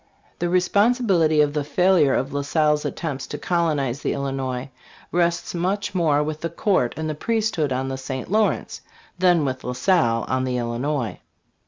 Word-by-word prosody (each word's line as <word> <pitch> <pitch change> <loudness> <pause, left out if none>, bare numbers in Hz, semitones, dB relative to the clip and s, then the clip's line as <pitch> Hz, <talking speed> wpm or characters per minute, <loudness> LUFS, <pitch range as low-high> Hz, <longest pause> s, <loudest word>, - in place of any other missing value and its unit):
The 175 - 0
responsibility 185 -4 +3
of 145 -1 +1
the 150 -1 -1
failure 160 -1 +3
of 135 +2 -2
La 145 - -1
Salle's 150 +1 +1
attempts 145 -5 -4
to 145 - -5
colonize 150 -6 0
the - - -1
Illinois 135 -1 -3 0.4
rests 170 0 0
much 190 +3 -1
more 155 -5 +2
with 155 0 -4
the 170 - -2
court 170 - 0
and 160 0 -3
the 155 - -2
priesthood 215 - -1
on 130 +1 -1
the 135 0 -4
St. 130 +3 -5
Lawrence 215 0 0 0.4
than 175 -4 +4
with 130 -1 -3
La 125 - -3
Salle 125 -4 +2
on 130 - 0
1 130 - -1
the 125 -1 -1
Illinois. 120 +1 -2
150 Hz, 175 wpm, -23 LUFS, 135-175 Hz, 0.4 s, than